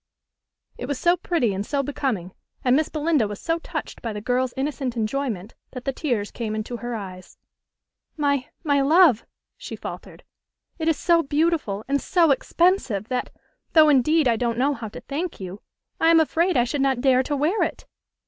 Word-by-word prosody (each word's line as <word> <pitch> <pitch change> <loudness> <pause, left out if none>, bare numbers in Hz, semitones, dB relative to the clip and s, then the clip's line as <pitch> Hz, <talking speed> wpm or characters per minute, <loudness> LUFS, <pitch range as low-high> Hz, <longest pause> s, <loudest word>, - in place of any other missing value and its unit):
It - - -4
was 285 - -2
so 345 +5 +3
pretty 320 - 0
and 195 +1 -2
so 275 +5 -1
becoming, 245 - -3 0.3
and 250 0 +4
Miss 310 +2 +1
Belinda 305 -6 +1
was 205 0 -7
so 330 0 -1
touched - - -6
by 230 - -3
the 210 - -4
girl's 250 +3 0
innocent 265 -3 -2
enjoyment, 225 -3 -2 0.2
that 255 -2 -7
the 270 - -1
tears 240 -9 -2
came 220 -3 -4
into 220 +3 -4
her 240 0 -4
eyes. 185 -3 -9 0.8
"My 280 -3 +1 0.2
my 285 -3 +2
love," 295 - +5 0.3
she - - -7
faltered, - - -9 0.6
"it 320 - -2
is 325 - +2
so 340 -1 +3
beautiful, 295 -9 0
and 280 +1 +1
so 335 -4 +3
expensive, 270 - +1
that 250 -1 -2 0.4
though 310 -2 +7
indeed 300 +2 +4
I 230 -2 +2
don't 235 0 -1
know 275 +4 +2
how 230 -4 -6
to 210 - -9
thank 320 +6 -4
you 190 +1 -7 0.4
I 325 - +4
am 330 0 +6
afraid 330 +1 +2
I 240 - +5
should 270 +3 -2
not 265 -3 +1
dare 260 -1 +4
to 290 +3 -2
wear 315 +10 +1
it." - - -2
270 Hz, 185 wpm, -24 LUFS, 230-310 Hz, 0.8 s, though